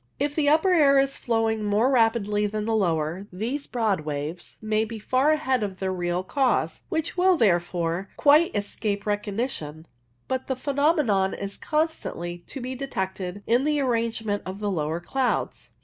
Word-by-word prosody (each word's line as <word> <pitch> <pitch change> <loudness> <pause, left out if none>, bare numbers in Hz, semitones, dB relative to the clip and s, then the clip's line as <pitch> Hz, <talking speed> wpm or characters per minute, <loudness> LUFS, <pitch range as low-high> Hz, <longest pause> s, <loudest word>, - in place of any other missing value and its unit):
If 285 +1 0
the 290 -1 +2
upper 320 +5 +4
air 285 -5 +5
is 275 0 +2
flowing 225 -2 0
more 210 +5 +2
rapidly 225 -4 +2
than 210 0 -3
the 225 - 0
lower, 175 -2 0
these 235 +10 -3
broad 220 -6 0
waves 150 +3 -5
may 215 0 0
be 225 +1 -6
far 255 +7 +2
ahead 265 -5 +1
of 195 -3 -3
their 190 0 -2
real 175 0 -1
cause, 265 +6 0
which 320 -3 -2
will, 365 0 +4
therefore, 175 - +1
quite 300 +2 +5
escape 205 0 -2
recognition, 205 - -3 0.4
but 260 0 -2
the 265 - -1
phenomenon 275 - +1
is 200 0 -5
constantly 300 - -2
to 275 - -6
be 255 +1 -4
detected 195 -7 -4
in 240 +3 +3
the 300 0 +1
arrangement 230 -5 -1
of 190 +2 -6
the 205 -1 -1
lower 160 -1 -1
clouds. 255 +7 -1
220 Hz, 165 wpm, -25 LUFS, 190-270 Hz, 0.4 s, air